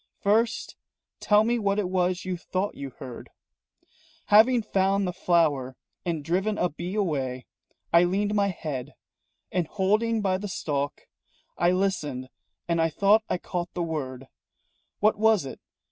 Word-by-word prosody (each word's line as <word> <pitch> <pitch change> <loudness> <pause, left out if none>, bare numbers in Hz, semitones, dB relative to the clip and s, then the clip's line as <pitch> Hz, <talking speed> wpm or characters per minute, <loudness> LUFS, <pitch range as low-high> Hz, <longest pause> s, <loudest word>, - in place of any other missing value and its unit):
"First 225 +3 +1 0.4
tell 210 0 +4
me 235 +1 +1
what 200 -1 +1
it 205 -3 0
was 180 0 0
you 185 -1 -2
thought 185 +3 -3
you 140 -1 -6
heard." 130 -2 -10 1.0
"Having 230 +2 +6
found 195 -1 +1
the 180 - -2
flower 155 -8 +1 0.3
and 165 -4 -3
driven 195 +6 0
a 180 - +1
bee 175 +5 -6
away, 135 -10 -1 0.5
I 170 +1 +7
leaned 200 +3 0
my 200 -1 +2
head, 155 -8 -5 0.6
And 180 -4 0
holding 215 +4 +1
by 190 -2 +1
the 205 - -4
stalk, 145 -6 -3 0.5
I 175 - +2
listened 155 -9 -1 0.4
and 170 -1 +1
I 165 - +3
thought 200 +7 +4
I - - +1
caught 175 -1 -5
the 175 - -1
word 135 -5 -4 0.7
What 215 0 +3
was 220 -6 +4
it? 135 - -8
185 Hz, 150 wpm, -26 LUFS, 155-205 Hz, 1.0 s, I